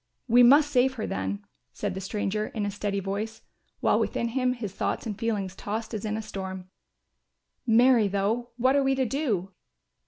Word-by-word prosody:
"We 245 +1 +6
must 285 +4 +6
save 260 0 +3
her 220 - -3
then," 95 +2 -3 0.3
said 205 -2 -3
the 190 - -5
stranger 210 +2 -2
in 215 -3 -3
a 205 - -2
steady 200 0 -2
voice, 210 +3 -4 0.4
while - - +3
within 235 - -1
him 250 +1 +1
his 220 -6 -6
thoughts - - -2
and 215 -3 -3
feelings 205 -4 -2
tossed 220 +4 -4
as 215 -1 -4
in 215 0 -1
a 220 - -4
storm. 190 -3 -6 1.0
"Marry 235 -1 +5
though, 205 +5 -1
what 255 +3 +3
are 280 - +4
we 270 0 +2
to 265 -1 +1
do?" 220 - -1
215 Hz, 185 wpm, -27 LUFS, 195-245 Hz, 1.0 s, We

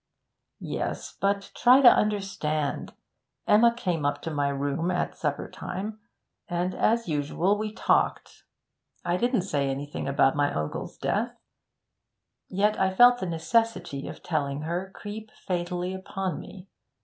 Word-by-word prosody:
'Yes; - - -4
but 200 0 0
try 255 +3 +6
to 260 - +8
understand. 195 -10 +1 0.5
Emma 230 +3 +6
came 180 -10 -2
up 145 - 0
to 165 - -3
my 145 -1 0
room 140 +5 -1
at 180 -1 -1
supper 145 -3 -2
time, 210 +4 -6 0.5
and 175 +1 -1
as 230 +1 +1
usual 160 +6 +1
we 215 0 -3
talked. 215 - 0 0.6
I 175 0 +1
didn't 240 0 +1
say 145 -7 0
anything 140 +2 -4
about 135 -1 +3
my 145 0 +2
uncle's 75 0 -4
death - - -1 1.1
yet 210 +3 +1
I 190 - +3
felt 245 +3 +7
the 185 - -3
necessity 170 -3 0
of - - -9
telling 145 -3 -1
her 175 +4 -3
creep 215 +1 -7 0.2
fatally 180 0 -2
upon 190 -2 -4
me. 190 -1 -11
180 Hz, 135 wpm, -27 LUFS, 150-210 Hz, 1.1 s, to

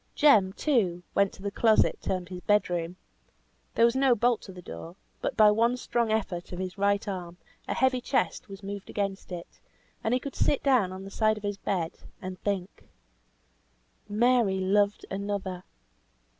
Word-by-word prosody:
Jem, 215 -11 +5
too, 195 - +1
went 200 -1 +3
to 190 - -13
the 200 - -2
closet 220 +1 +3
termed 185 -2 -2
his 180 -1 -7
bed 205 -2 +2
room. 170 0 -2 0.8
There 230 - +6
was 235 +1 +2
no 265 -2 +4
bolt 235 0 +2
to 195 - -10
the 180 - -11
door; 85 - -8 0.3
but - - -2
by 215 -1 +7
one 230 +3 +2
strong 235 -2 0
effort 195 -5 -2
of 180 - -5
his 185 0 -4
right 200 +1 +1
arm, 180 -3 -5 0.3
a - - -1
heavy 260 -1 +2
chest 255 -4 -1
was 195 +1 -10
moved 200 0 -6
against 195 -2 -3
it, 175 -1 -8 0.4
and 220 - 0
he - - +1
could 275 +1 -7
sit 285 - +1
down 250 -9 +3
on 190 +1 -7
the 195 - -9
side 215 +1 +2
of 210 - -10
his 205 -1 -2
bed, 180 -5 -2 0.2
and 185 0 -7
think. 195 -3 -4 1.2
Mary 225 -2 +3
loved 200 +2 +2
another! 195 -2 -3
200 Hz, 180 wpm, -28 LUFS, 185-225 Hz, 1.2 s, by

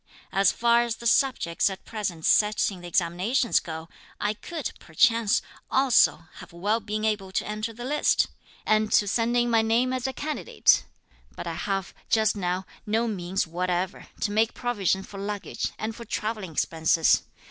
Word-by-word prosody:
As 195 -1 +4
far 235 0 +3
as 235 -1 -1
the 235 - -12
subjects 230 -9 +2
at 190 - -8
present 195 -8 -4
set 210 0 +3
in 185 -2 -9
the 175 - -8
examinations 180 +9 +1
go, 160 0 -7 0.3
I 210 0 0
could, 315 +7 -5
perchance, 230 +5 +2 0.3
also 255 - +4
have - - -11
well 205 +6 0
been 215 0 -3
able 205 -3 -1
to - - 0
enter 215 +2 -3
the 240 +2 -8
list, 295 +3 +2 0.4
and 215 0 +2
to 205 - +4
send 235 +3 +1
in 240 0 +2
my 225 -1 +5
name 235 +3 +2
as 255 0 -1
a - - -2
candidate; 300 +3 +1 0.5
but - - -6
I 170 - -3
have, 195 +3 -3 0.2
just 220 -1 +3
now, 185 -1 -2 0.2
no 225 +3 +1
means 190 -2 -1
whatever 180 +2 -2
to 205 - 0
make 220 +2 +1
provision 200 -6 0
for 195 - -10
luggage 205 0 -3
and 220 0 -4
for 235 - -8
travelling 210 -6 -4
expenses. 160 +1 +2
210 Hz, 170 wpm, -26 LUFS, 185-230 Hz, 0.5 s, my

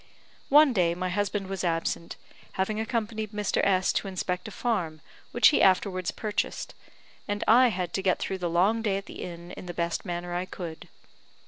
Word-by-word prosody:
One 295 -1 +7
day 175 -5 +2
my 185 +1 -2
husband 205 +1 -1
was 190 -1 -4
absent, 170 -1 -1 0.4
having 210 +3 -1
accompanied 220 -2 -2
Mr. 210 -1 0
S 190 -1 +3
to - - -1
inspect 180 0 -3
a - - -7
farm, 185 -10 -2 0.3
which 240 - +6
he 300 - +2
afterwards 185 -1 +3
purchased, 210 -2 -3 0.5
and 205 0 -2
I 250 +3 +7
had 180 -6 -2
to 195 - 0
get 190 -2 +2
through 190 - -3
the 175 -1 -1
long 195 +7 +2
day 205 -3 0
at 195 - -6
the - - -9
inn 175 0 -7
in 185 - -9
the 175 - -6
best 170 -1 -1
manner 175 0 -4
I 180 +1 -1
could. 170 -4 -8
190 Hz, 190 wpm, -27 LUFS, 175-215 Hz, 0.5 s, One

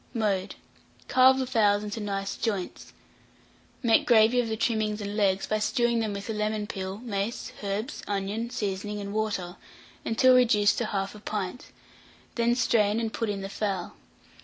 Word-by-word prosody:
Mode. 205 -4 -1 0.5
Carve 260 +1 +6
the 265 - 0
fowls 210 -4 +2
into 210 +2 -5
nice 195 -2 -3
joints; 205 -5 -3 0.9
make 230 -2 +4
gravy 230 +1 +5
of 235 - -4
the 220 - -2
trimmings 215 -2 0
and 205 0 -4
legs, 195 -2 +2
by 215 - -1
stewing 235 +2 +1
them 220 -2 -1
with 200 0 -6
the 225 - -3
lemon 210 0 -1
peel, 190 -1 -5
mace, 210 0 -3
herbs, 210 +8 -3
onion, 205 +3 -2
seasoning, 205 -1 -3
and 200 0 -5
water, 205 -4 -2 0.5
until 255 +3 +4
reduced 225 -5 +4
to 235 - 0
1/2 200 0 -4
pint; 205 +3 -4 0.7
then 235 0 +2
strain, 220 -3 +2
and 225 -1 -3
put 230 -2 -2
in 200 -1 -3
the 195 - -4
fowl. 195 -3 -3
210 Hz, 160 wpm, -27 LUFS, 200-230 Hz, 0.9 s, Carve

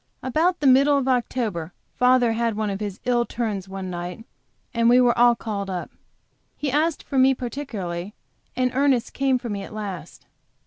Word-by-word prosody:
About 325 +7 +1
the - - -1
middle 275 +2 +5
of 270 -2 -1
October 225 -9 -1 0.2
father 250 -1 +4
had 230 -1 0
one 215 -2 -1
of 195 - -4
his 205 -2 -5
ill 240 -1 +2
turns 210 -6 -4
one 190 -1 -5
night, 175 +5 -6 0.5
and 230 0 +3
we 245 +1 +6
were 245 -1 +4
all 240 0 +5
called 200 -4 -4
up. 180 -2 -4 0.7
He 290 -3 -2
asked 310 +3 +1
for 270 - -1
me 265 +1 +5
particularly, 210 -8 -5 0.4
and 255 0 +1
Ernest 265 -3 +1
came 270 -1 +2
for 245 -1 -6
me 200 -1 -3
at 210 - -9
last. 200 -4 -7
235 Hz, 180 wpm, -23 LUFS, 200-260 Hz, 0.7 s, we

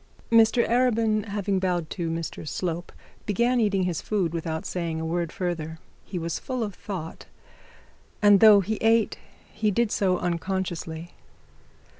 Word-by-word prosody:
Mr 230 +1 +5
Arabin 215 -5 +1
bowed 180 -3 -1
to 170 -4 -3
Mr 165 -1 -5
Slope, 175 +1 -3 0.4
began 240 +4 +2
eating 200 -4 +2
his 180 -3 -1
food, 190 -6 -1
without 160 -1 -3
saying 170 -3 -3
a 160 - -3
word 170 0 -1
further. 165 -3 -3 0.3
He 185 - -5
was 165 -1 -3
full 255 -3 -3
of 205 -2 -4
thoughts, 180 -5 -7 0.9
and 205 -2 +6
though 210 -1 +8
he 215 +3 -2
ate 225 -1 +2 0.3
he 215 0 0
did 220 +2 +1
so 185 -2 +2
unconsciously. 175 -2 -3
190 Hz, 140 wpm, -26 LUFS, 170-215 Hz, 0.9 s, though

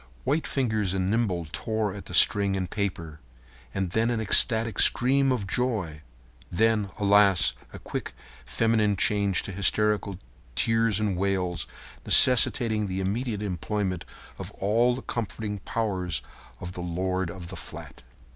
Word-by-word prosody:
White 155 +2 0
fingers 110 -8 -1
and 95 0 -1
nimble 100 -7 0
tore 110 -3 -2
at 100 - -9
the - - -6
string 100 -1 +5
and 95 -1 -2
paper. 90 -6 -4 0.5
And 95 +2 -3
then 110 +4 +1
an 120 -2 -1
ecstatic 110 +1 +2
scream 135 +2 +3
of 120 -6 -1
joy; 95 -8 -2 0.5
and 85 - -7
then, 110 -2 +2
alas! 100 -3 +4 0.2
a - - -9
quick - - -6 0.3
feminine 110 -3 +1
change 100 -2 +1
to - - -6
hysterical 100 0 0 0.4
tears 115 - +2
and 105 -3 -1
wails, 90 -3 -2 0.4
necessitating 115 -4 +4
the 95 0 -3
immediate 105 +3 -2
employment 95 0 -3 0.4
of - - -6
all 115 +5 +1
the 130 - -8
comforting 105 -1 -4
powers 95 -5 -2 0.4
of 90 - -6
the 90 - -7
lord 90 +1 -2
of 85 0 -9
the - - -7
flat. - - -10
100 Hz, 145 wpm, -26 LUFS, 95-110 Hz, 0.5 s, string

